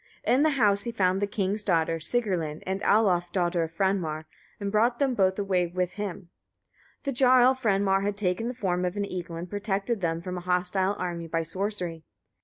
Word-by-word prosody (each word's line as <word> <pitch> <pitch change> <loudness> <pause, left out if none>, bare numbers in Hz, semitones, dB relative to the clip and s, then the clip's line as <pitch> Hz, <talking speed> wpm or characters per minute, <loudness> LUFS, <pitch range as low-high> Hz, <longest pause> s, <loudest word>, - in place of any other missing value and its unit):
In 260 - +3
the 310 - +4
house 205 -4 +4
he 235 - -4
found 190 -3 +1
the 205 - +1
king's 205 0 -1
daughter 165 -4 +1
Sigrlinn, 170 -6 -1
and 190 +1 -2
Alof 180 -5 +3
daughter 175 -2 +1
of 165 -1 -2
Franmar, 175 -6 0 0.3
and 200 -1 -3
brought 235 +3 +2
them 275 -2 +1
both 190 -4 +2
away 190 -3 +1
with 180 +1 -2
him. 195 -3 -6 0.7
The 280 - -1
jarl 255 0 +5
Franmar 200 -6 +1
had 200 0 -2
taken 200 +3 -1
the 250 - -4
form 180 -6 -1
of 180 +2 -2
an 200 - 0
eagle, 175 -3 -6
and 170 +2 -5
protected 205 +2 -2
them 165 -1 0
from 180 +1 -5
a - - -9
hostile 180 +2 0
army 170 -2 -4
by 165 0 -1
sorcery. 180 -1 -3
190 Hz, 195 wpm, -27 LUFS, 175-210 Hz, 0.7 s, jarl